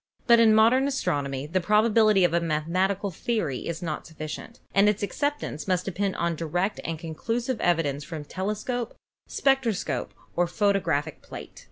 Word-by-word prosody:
But 235 -1 +6
in 220 -2 +6
modern 240 +5 +5
astronomy 145 - -1
the 180 +5 -1
probability 215 0 +4
of 175 -2 +3
a 170 - +4
mathematical 185 +5 0
theory 170 - -2
is 170 +1 -4
not 155 -3 -4
sufficient, 160 +8 -7
and 200 +1 +5
its 210 0 -1
acceptance 285 - -2
must 180 -1 +1
depend 195 +1 -1
upon 170 0 0
direct 175 +6 -1
and 165 -1 -3
conclusive 225 +10 -3
evi 170 -2 +2
dence 145 0 -3
from 155 0 -7
telescope, 215 - -3 0.3
spectroscope 230 - 0 0.2
or 175 0 +2
photographic 175 -6 0
plate. - - -10
185 Hz, 155 wpm, -26 LUFS, 160-220 Hz, 0.3 s, But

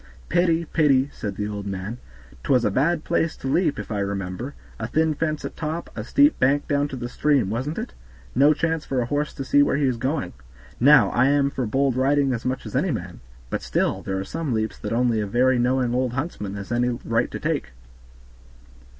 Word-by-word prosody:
"Pity! 170 -1 +2
pity!" 145 -4 +2
said 100 -2 -5
the 105 +1 -3
old 100 -1 -5
man; 100 +5 -5 0.4
"'twas 125 -3 +2
a 105 - +2
bad 155 - +1
place 165 -1 0
to - - -6
leap, 155 +2 +1
if 105 +1 -6
I 105 - -1
remember; 100 +6 -4 0.2
a 110 - -3
thin 160 +4 +1
fence 155 0 -2
at - - -6
top, 160 +2 -4
a - - -4
steep 290 +2 +3
bank 140 +3 +2
down 145 0 +1
to 140 - -7
the 120 -1 -4
stream, 135 -5 +1
wasn't 130 +8 -3
it? - - -5 0.4
No 140 +4 +5
chance 160 +1 0
for 135 - -2
a - - -1
horse 145 +4 -1
to 135 - -4
see 145 +2 +4
where 145 - +3
he 140 0 +1
is 130 -3 +1
going. 135 +5 -2 0.5
Now, 145 +2 +6
I 125 +2 +3
am 140 0 +2
for 130 -4 -2
bold 135 +3 +1
riding 135 +1 +2
as 115 - -4
much 130 +1 -2
as - - -7
any 160 +8 +1
man, 90 - -4 0.3
but - - -2
still - - 0
there 95 0 -3
are - - -3
some 160 -4 -3
leaps 110 -1 -2
that - - -5
only 115 -1 +2
a 105 - -2
very 125 +4 +3
knowing 125 0 +1
old 125 -1 0
huntsman 125 - -4
has 100 +2 -7
any 120 +1 +2 0.2
right - - +1
to - - -6
take. - - -2
130 Hz, 220 wpm, -24 LUFS, 115-150 Hz, 0.5 s, Now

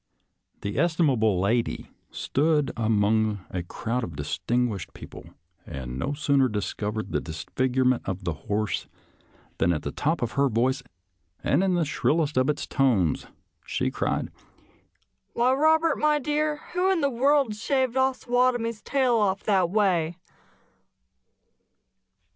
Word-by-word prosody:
The 100 - -3
estimable 135 - +2
lady 115 +5 -1 0.2
stood 150 -1 +1
among 110 -2 +1
a 90 - -2
crowd 115 +7 -3
of 110 - -6
distinguished 105 +7 -2
people, - - -10 0.4
and 65 -4 -6
no 140 - -1
soon&r 140 -2 +3
discovered 105 0 -3
the - - 0
disfigurement 125 +10 0
of 95 0 -4
the 85 -2 -1
horse 105 +7 -2 0.7
than 85 - +3
at 75 -4 -2
the 70 - -3
top 155 - -1
of 120 - -2
her 140 0 +2
voice 130 +4 +1 0.6
and 185 - +2
in 190 -2 +2
the 170 -2 +1
shrillest 150 +1 0
of 130 +2 +2
its 150 - -1
tones, 115 - +1 0.4
she - - -1
cried, - - -1 0.5
" - - -45
Why, 245 +2 +3
Eobert, 315 +2 +3
my 300 0 +3
dear, 300 +1 -1
who 365 +2 +2
in 365 -4 +1
the 280 -1 +1
world 270 -1 +2
shaved 260 +2 0
Ossawatomie's 245 -3 +1
tail 260 -4 +2
off 200 -2 +1
that 190 -4 +2
way? 175 -5 +1
140 Hz, 135 wpm, -26 LUFS, -, 0.7 s, soon&r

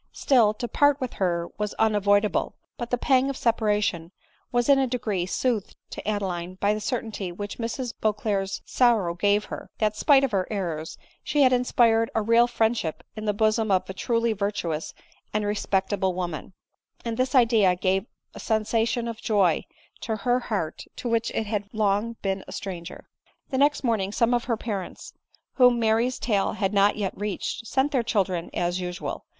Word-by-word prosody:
Still, 230 -6 +3
to 240 - -4
part 285 +3 +3
with 255 -2 -4
her 170 -2 +1
was 210 -1 -2
unavoid 205 -1 +3
able; 210 - -2 0.2
but 240 - -5
the 245 - +1
pang 260 +1 +2
of 275 - -4
separation 210 -7 0 0.4
was 240 -1 +1
in 280 -1 +6
a 265 - +2
degree 215 -7 -2
soothed 225 0 -1 0.2
to - - -7
Adeline 185 -4 -2
by 200 +2 +1
the 215 - -3
certainty 215 -5 -3
which 205 +5 -7
Mrs 235 +1 -3
Beauclerc's 205 -2 -1
sor 240 -5 +3
row 170 -1 -2
gave 205 +4 +2
her, - - -8
that 215 -1 +1
spite 275 +3 +5
of 270 - +1
her 190 -3 0
errors, 170 -6 -4 0.3
she 295 -1 +2
had 255 -1 +5
inspired 230 -2 +3
a 220 - +2
real 230 +2 +5
friendship 225 -8 -1
in 215 0 -6
the 210 - +2
bosom 215 +1 +1
of 190 -2 +2
a 190 - -5
truly 230 +3 0
virtuous 195 -6 -3 0.4
and 210 -1 +1
re 205 - 0
spectable 190 -2 0
woman; 175 -1 -4 0.5
and 230 -1 -2
this 255 +3 0
idea 225 -7 +5
gave 190 +3 0 0.3
a - - -10
sensation 225 +2 0
pf 230 -1 -5
joy 195 -7 +2 0.4
to 220 - -3
her 245 +4 +1
heart 205 -10 -3
to - - -5
which 230 0 +1
it 220 - 0
had 205 -1 -3
long 215 +1 +1
been 195 -1 -1
a - - -9
stranger. 175 -4 -7 0.4
The 260 - 0
next 290 +1 +3
morning 215 -6 0
some 230 +3 +2
of 240 -1 0
the 230 -3 0
parents, 205 -5 -6 0.4
whom 250 -2 +6
Mary's 230 +2 +1
tale 200 -4 0
had 205 -2 -1
not 200 0 +4
yet 200 -3 -3
reached, 210 +3 -4
sent 270 +4 +1
their 265 -4 +2
children, 190 -7 -1
as 175 +1 0
usual. 180 -1 -5
215 Hz, 185 wpm, -25 LUFS, 195-235 Hz, 0.5 s, in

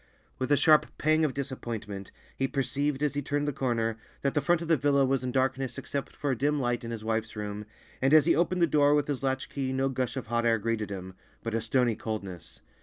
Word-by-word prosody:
With 130 +2 -2
a 145 - +6
sharp 155 +1 +5
pang 155 +1 +3
of 145 -5 0
disappointment, 115 -8 -5 0.2
he 135 - 0
perceived, 140 +1 -1
as 150 - +1
he 145 - -1
turned 145 +1 -1
the 145 - 0
corner, 115 -4 0 0.2
that 140 - 0
the 150 - +2
front 175 +1 +2
of - - -6
the 165 - +5
villa 140 -1 +3
was 135 -1 +1
in 125 - -2
darkness 130 -1 0
except 140 -1 -4
for 145 -1 -1
a - - +1
dim 145 +4 +1
light 120 -1 -1
in 115 - -5
his 115 -2 -5
wife's 110 0 -2
room, 105 0 -5 0.3
and 135 +1 +3
as 155 -1 +7
he 170 - +4
opened 175 +1 +2
the - - +8
door 145 -2 +4
with 145 -1 +1
his 145 -3 -2
latch 130 -1 -1
key 135 -2 -3
no 135 +1 +1
gush 130 0 -2
of 130 - -4
hot 120 +1 0
air 115 -1 +3
greeted 110 -1 -2
him, 95 -2 -6 0.3
but 115 - -3
a 115 - 0
stony 120 0 +2
coldness. 95 -7 -6
130 Hz, 245 wpm, -29 LUFS, 115-145 Hz, 0.3 s, the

